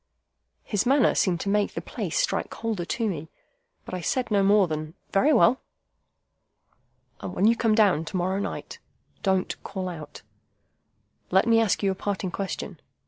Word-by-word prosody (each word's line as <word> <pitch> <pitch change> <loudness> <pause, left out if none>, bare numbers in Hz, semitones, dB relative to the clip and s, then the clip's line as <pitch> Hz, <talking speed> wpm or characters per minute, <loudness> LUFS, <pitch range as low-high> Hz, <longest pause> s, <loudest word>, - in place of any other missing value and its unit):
His 205 +3 -1
manner 270 -2 +4
seemed 180 -3 +1
to 200 - -2
make 205 0 +1
the - - -1
place - - -4
strike - - 0
colder 220 -6 -3
to 230 +5 -1
me, 160 -5 -4 0.6
but - - -9
I 180 - -3
said 245 +6 -1
no 200 -1 +4
more 200 -1 +4
than, 155 +1 -5 0.2
"Very 265 +10 +3
well." 255 -1 +4 1.6
"And - - -6
when 195 - +2
you 230 +2 +5
come 225 -2 +2
down 200 -8 +4
to 185 - -4
morrow 185 +2 0
night, - - -5 0.4
don't 190 -2 0
call 190 -2 -5
out! 165 -4 -8 1.1
Let 190 +3 +4
me 230 -1 +4
ask 215 -2 +1
you 195 - +3
a - - 0
parting 190 -1 -3
question. 195 0 -5
200 Hz, 170 wpm, -26 LUFS, 185-225 Hz, 1.6 s, you